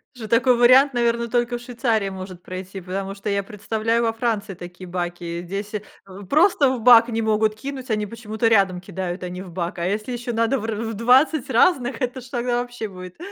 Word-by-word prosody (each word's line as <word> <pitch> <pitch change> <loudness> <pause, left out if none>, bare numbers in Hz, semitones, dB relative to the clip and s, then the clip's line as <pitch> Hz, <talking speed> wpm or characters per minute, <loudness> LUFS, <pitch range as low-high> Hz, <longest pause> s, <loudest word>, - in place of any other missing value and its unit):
Ж 230 -3 -7
такой 235 +2 +3
вариант, 255 +3 +6
наверно, 235 -1 +1
только 240 +1 0
в - - -12
Швейцарии 230 -4 -1
может 185 -1 -8
пройти, 185 +1 -7
потому 195 +2 -4
что 200 +1 -5
я 200 0 0
представляю 220 +3 -1
во 225 - +2
Франции 225 -3 -2
такие 175 +1 -10
баки. 175 -1 -4
Здесь 200 +4 -5 0.3
в 195 +1 -11
просто 305 - +4
в 250 -3 -3
бак 240 0 +7
не 225 0 -1
могут 215 -1 +1
кинуть, 265 +1 -6
они 210 -1 0
почему-то 225 +1 -2
рядом 195 -5 +3
кидают, 185 -1 -5
а 180 - -4
не 180 +1 -7
в 180 - -11
бак. 175 0 -4
А 170 - -2
если 210 +6 -2
еще 240 0 -4
надо 230 +4 +1
в 215 - -5
р 225 -1 -2
в 225 0 -3
20 255 +6 +3
разных, 250 -2 +2
это 255 +1 -2
ж - - -13
тогда 245 -1 -1
вообще 245 -3 -6
будет! 185 -2 -11
220 Hz, 210 wpm, -22 LUFS, 190-240 Hz, 0.3 s, бак